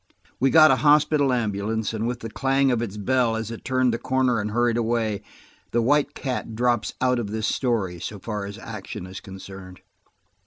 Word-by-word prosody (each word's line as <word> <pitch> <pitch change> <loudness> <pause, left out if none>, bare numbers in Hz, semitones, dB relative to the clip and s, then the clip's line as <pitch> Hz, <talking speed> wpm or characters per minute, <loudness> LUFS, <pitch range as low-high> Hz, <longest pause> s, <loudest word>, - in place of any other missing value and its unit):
We 135 - +3
got 155 +1 +7
a - - +4
hospital 150 -2 +4
ambulance, 110 -2 -1
and 110 +1 -2
with 125 0 -3
the 115 - -5
clang 135 +1 +2
of 120 -2 0
its 105 -3 -4
bell 120 +2 +1
as 110 0 -4
it 115 - -8
turned 130 -2 +1
the 115 - -2
corner 130 -1 +1
and 105 - -3
hurried 120 +1 +1
away, 115 -3 0 0.5
the 120 - +3
White 145 +4 +2
Cat 125 -4 -4
drops 120 -3 0
out 125 -1 +2
of 115 - -3
this 110 +1 -3
story, 105 -9 -1
so 105 - -6
far 105 0 -4
as 100 +1 -8
action 110 -6 -7
is 95 +1 -8
concerned. 95 -1 -10
115 Hz, 195 wpm, -24 LUFS, 105-130 Hz, 0.5 s, got